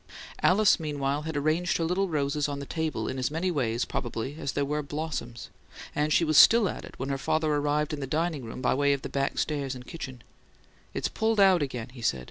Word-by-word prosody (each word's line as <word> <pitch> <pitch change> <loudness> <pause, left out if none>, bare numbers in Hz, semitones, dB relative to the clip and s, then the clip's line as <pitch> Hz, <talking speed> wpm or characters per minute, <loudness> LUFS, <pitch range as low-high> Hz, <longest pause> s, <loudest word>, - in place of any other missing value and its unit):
Alice, 200 +1 +5
meanwhile, 145 -2 -1
had 160 0 -4
arranged 155 +5 +1
her 165 - -1
little 180 +3 0
roses 145 -1 0
on 140 - -3
the 140 - -6
table 160 +1 -2
in 130 - -3
as 130 - 0
many 165 +5 -1
ways, 120 -6 0
probably, 120 +3 -4
as 140 -4 -3
there 140 - 0
were 150 +2 -1
blossoms; 145 -5 -5 0.4
and 150 +1 0
she 165 - +4
was 155 -2 +5
still 230 -3 +7
at - - -5
it - - -11
when 135 - -4
her 135 -1 -1
father 155 +2 +1
arrived 150 +1 0
in 150 - -3
the 135 - -4
dining 155 -1 -1
room 115 +3 -7
by - - +3
way 140 +1 +3
of 140 - -3
the - - -4
back 140 0 -1
stairs 140 -3 -1
and 125 - -9
the - - -15
kitchen. 130 -7 -7 0.7
"It's - - 0
pulled 220 -1 0
out 190 -4 +6
again," 125 -4 -3
he 125 -1 -12
said. 70 - +1
145 Hz, 235 wpm, -28 LUFS, 135-160 Hz, 0.7 s, still